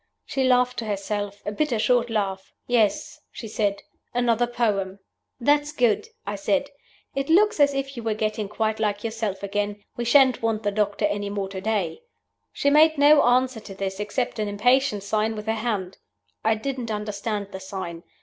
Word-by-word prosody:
She 270 - -1
laughed 250 -1 +3
to 230 - -4
herself 205 0 -3
a 205 - -2
bitter, 255 +2 0
short 240 +2 +2
laugh. 195 -3 -2
'Yes,' 230 -4 +1
she 225 - -8
said, 205 -2 -1 0.3
'another 240 -1 +2
poem.' 205 -5 -1 0.4
'That's 290 +3 +2
good,' 240 -6 +2 0.2
I 205 0 -3
said; 280 +7 0 0.4
'it 275 +1 -2
looks 415 +3 +4
as 285 -1 +4
if 275 0 -3
you 235 - -5
were 220 -1 -1
getting 215 -1 -2
quite 220 +1 -1
like 210 -1 -1
yourself 220 -4 -3
again. 205 +1 -2
We 240 - -2
shan't 260 +1 +5
want 225 -1 0
the 205 - +1
doctor 205 0 0
any 205 0 -1
more 200 -1 -3
to 190 -1 -6
day.' 210 - -1 0.5
She 285 - +1
made 315 +1 +6
no 290 +1 +7
answer 250 0 +2
to 200 -2 -10
this, 190 0 -4
except 220 +3 -2
an 210 - 0
impatient 245 +1 +2
sign 215 +2 0
with 210 0 -6
her 220 - 0
hand. 215 -5 -3 0.4
I 220 0 +3
didn't 250 +1 -4
understand 210 -1 -3
the 190 - -6
sign. 190 -3 -6
220 Hz, 180 wpm, -24 LUFS, 205-250 Hz, 0.5 s, no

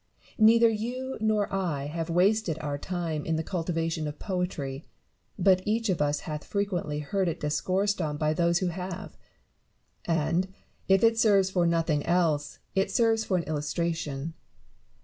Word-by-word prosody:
Neither 230 +2 +7
you 245 +4 -3
nor 215 -2 +1
I 170 -8 -1
have 165 +3 -4
wasted 185 0 +2
our 145 -2 -4
time 165 -3 -3
in 160 - -1
the 160 - -1
cultiva 165 -1 -2
tion 160 -2 -2
of 150 0 -6
poetry: 165 -7 -3 0.5
but 185 -1 +4
each 225 +2 0
of 180 - +1
us 145 0 +1
hath 150 -1 -5
frequently 180 -7 -2
heard 190 +5 -1
it 165 - -2
discoursed 190 +6 0
on 150 -2 -2
by 155 0 +1
those 170 +1 +2
who - - +1
have; 180 +1 -6 0.9
and, 165 +2 +1 0.4
if 195 +1 +4
it 225 0 +4
serves 200 -4 +4
for 175 -2 +2
nothing 165 -3 +1
else, 160 -5 +1 0.2
it 195 0 +1
serves 225 -1 +2
for 185 - +1
an 170 - -1
illustration. 155 -1 -2
175 Hz, 160 wpm, -28 LUFS, 155-195 Hz, 0.9 s, Neither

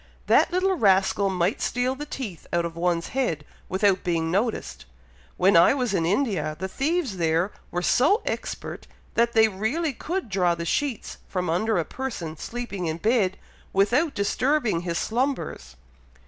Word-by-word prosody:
That - - +4
little 370 +2 +2
rascal 195 - +3
might 185 +1 0
steal 250 +1 0
the 295 +3 -7
teeth 215 - -6
out 170 0 +1
of 165 -1 -5
one's 170 0 0
head, 170 - -1 0.2
without 190 0 +2
being 165 -2 0
noticed! 185 - -2 0.5
When 190 +1 +4
I 170 +10 +6
was 250 -6 -1
in 165 -4 +1
India, 185 - 0
the 190 - -3
thieves 275 - -1
there 165 +3 +1 0.2
were 175 0 -2
so 305 - +3
expert - - -5 0.3
that 235 0 +2
they 220 -2 +6
really 235 - -1
could 350 +5 -3
draw 180 -4 +1
the 170 0 -5
sheets 270 - -2
from 180 -3 -1
under 215 +5 +1
a 165 - 0
person 205 -12 -5
sleeping 200 -1 -5
in 160 0 -2
bed, 210 -1 +1 0.4
without 240 +11 +2
disturbing 240 - +1
his 170 -1 -2
slumbers." 245 - -2
200 Hz, 160 wpm, -25 LUFS, 170-255 Hz, 0.5 s, I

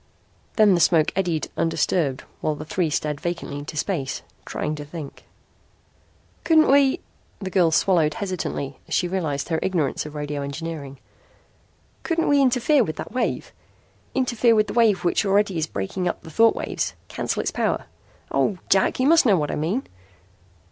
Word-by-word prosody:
Then 215 -3 +5
the 175 - +2
smoke 160 -1 +4
eddied 175 -5 0
undisturbed 165 -4 0 0.2
while 155 - -1
the 155 - -8
three 170 +1 0
stared 150 -1 -2
vacantly 170 -4 -4
into 155 +2 -7
space, 145 -7 -2 0.2
trying 150 - -3
to 150 -1 -6
think. 145 -1 -9 1.2
"Couldn't 315 -3 +5
we" 275 -1 +4 0.4
the 190 -2 -6
girl 180 -3 +4
swallowed 160 -2 +2
hesitantly 175 -8 -4
as - - -2
she 180 - +1
realized 160 -6 -2
her 160 -1 0
ignorance 170 -7 0
of 150 - -11
radio 145 -1 -3
engineering 140 -1 -6 1.0
"couldn't 330 -1 0
we 285 -1 +4
interfere 260 +2 +3
with 155 -7 -4
that - - -7
wave? 255 - -2 0.6
Interfere 240 -3 +3
with 215 -1 +4
the - - -6
wave 220 -6 +3
which 175 - +2
already 200 -3 +2
is 155 - -1
breaking 170 - -3
up - - -3
the 160 - -10
thought 225 +7 +4
waves. - - -3
Cancel - - -2
its - - -1
power. - - -1 0.5
Oh, 200 - +1
Jack, 190 +5 +3
you 255 - +2
must 315 -2 +5
know 200 -4 +5
what 150 -2 -1
I - - -2
mean." 180 - -1
175 Hz, 170 wpm, -23 LUFS, 150-215 Hz, 1.2 s, Then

